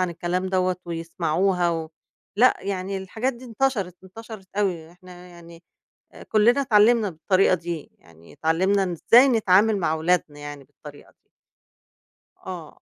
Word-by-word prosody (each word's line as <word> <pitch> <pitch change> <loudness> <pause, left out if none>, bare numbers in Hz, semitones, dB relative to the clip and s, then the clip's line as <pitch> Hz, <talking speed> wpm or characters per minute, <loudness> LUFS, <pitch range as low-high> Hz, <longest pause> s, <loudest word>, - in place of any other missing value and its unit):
عن 185 -1 0
الكلام 175 +2 -3
دوّة 185 -1 0
ويسمَعوها 170 +2 -1
و 165 -1 -4 0.5
لأ 250 +4 +5
يعني 195 0 -4
الحاجات 220 +7 -3
دي 240 +1 -13
انتشرِت، 225 -6 -2
انتشرِت 215 0 -11
أوي، 175 -6 -2
إحنا 180 0 -15
يعني 170 -1 -15 0.5
آآ - - -12
كلنا 235 +6 +3
اتعلّمنا 220 -2 +3
بالطريقة 185 +3 +1
دي، 170 -3 -7
يعني 85 0 -19
اتعلّمنا 190 +5 +1
إزاي 240 - +5
نتعامل 215 -3 +3
مع 165 -4 0
أولادنا 160 -2 -1
يعني 145 -1 -9
بالطريقة - - -15
دي. - - -43 1.2
آه. 175 -5 -8
185 Hz, 135 wpm, -23 LUFS, 165-210 Hz, 1.2 s, لأ